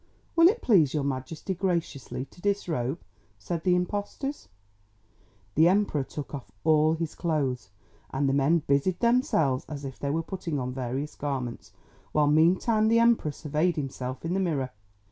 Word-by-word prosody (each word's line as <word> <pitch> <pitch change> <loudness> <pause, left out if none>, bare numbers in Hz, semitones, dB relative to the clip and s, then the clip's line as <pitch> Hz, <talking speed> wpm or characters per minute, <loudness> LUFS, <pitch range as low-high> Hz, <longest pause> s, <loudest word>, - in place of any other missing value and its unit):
"Will 335 0 +8
it 455 +6 +1
please 165 - +4
your 150 - 0
Majesty 140 +7 -3
graciously 170 -8 -2
to 175 - -17
disrobe," 170 -8 -1 0.4
said 170 -2 -4
the 180 -1 +3
impostors. 205 - -3 1.0
The 160 +3 +5
Emperor 185 -6 +2
took 145 +2 -8
off 135 -8 -7
all 155 0 +4
his 165 -1 -3
clothes, 135 - -1 0.4
and 140 +1 0
the 135 - +2
men 145 +4 +3
busied 140 +6 +1
themselves 200 - +2
as 145 -2 -6
if 135 -1 -7
they 140 - -2
were 160 +3 0
putting 170 -4 -4
on 125 -1 -3
various 130 +3 -3
garments, 130 -5 -4 0.4
while 150 -1 +4
meantime 180 +9 +3
the 230 +1 +4
Emperor 230 -9 +3
surveyed 155 +4 0
himself 130 -2 -4
in 170 - -1
the 190 - +1
mirror. 145 -9 -1
155 Hz, 160 wpm, -27 LUFS, 135-180 Hz, 1.0 s, Will